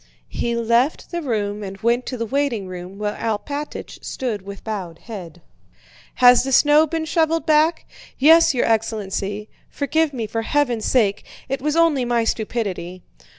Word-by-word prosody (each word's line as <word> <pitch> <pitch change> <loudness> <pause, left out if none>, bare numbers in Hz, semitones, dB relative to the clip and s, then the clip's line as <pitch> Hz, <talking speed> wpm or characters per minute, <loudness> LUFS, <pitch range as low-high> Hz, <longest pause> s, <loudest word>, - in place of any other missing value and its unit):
He 235 0 -2
left 235 +5 +1
the 345 -1 -2
room 210 -6 -2
and 195 -1 -6
went 235 +2 +1
to 255 - -4
the 230 - -2
waiting 260 -4 -1
room 185 +1 -8
where 210 0 -2
Alpátych 285 +7 -4
stood 235 -6 -3
with 200 0 -10
bowed 190 -7 -5
head. 175 -7 -10 0.7
"Has 245 -1 +6
the 270 - -3
snow 295 +4 +5
been 320 +1 -2
shoveled 325 0 +1
back?" 310 +1 +3 0.3
"Yes, 325 +4 +6
your 245 - +2
excellency. 210 -2 -1 0.2
Forgive 315 +2 0
me 240 -5 -4
for 225 +2 -3
heaven's 240 -3 0
sake... 205 -6 +2 0.2
It 270 0 -3
was 300 +2 0
only 330 -6 +3
my 240 -1 +1
stupidity." 200 -6 -3
235 Hz, 155 wpm, -21 LUFS, 205-285 Hz, 0.7 s, Has